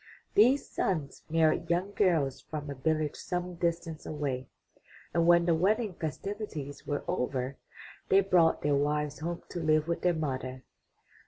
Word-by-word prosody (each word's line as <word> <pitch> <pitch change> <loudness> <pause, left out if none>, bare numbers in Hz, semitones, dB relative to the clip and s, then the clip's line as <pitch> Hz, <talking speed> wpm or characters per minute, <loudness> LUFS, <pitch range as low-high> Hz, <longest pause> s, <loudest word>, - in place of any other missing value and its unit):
These 250 +7 +5
sons 155 -7 -2
married 160 -1 +2
young 180 +4 +1
girls 160 -10 +2
from 150 -2 -6
a - - -2
village 155 +2 0
some 180 -1 -3
distance 170 -2 -2
away, 140 -4 -3 0.7
and 170 0 +2
when 170 0 +6
the 170 - +4
wedding 205 +5 +1
festivities 160 -3 -5
were 145 -1 -1
over, 130 +1 -2 0.5
they 195 - +6
brought 180 -4 +3
their 145 0 +2
wive5 150 +1 0
home 170 +2 -3
to 175 - -4
live 155 -1 +2
with 170 - -1
their 180 -1 +2
mother. 130 -4 -3
160 Hz, 150 wpm, -30 LUFS, 145-175 Hz, 0.7 s, when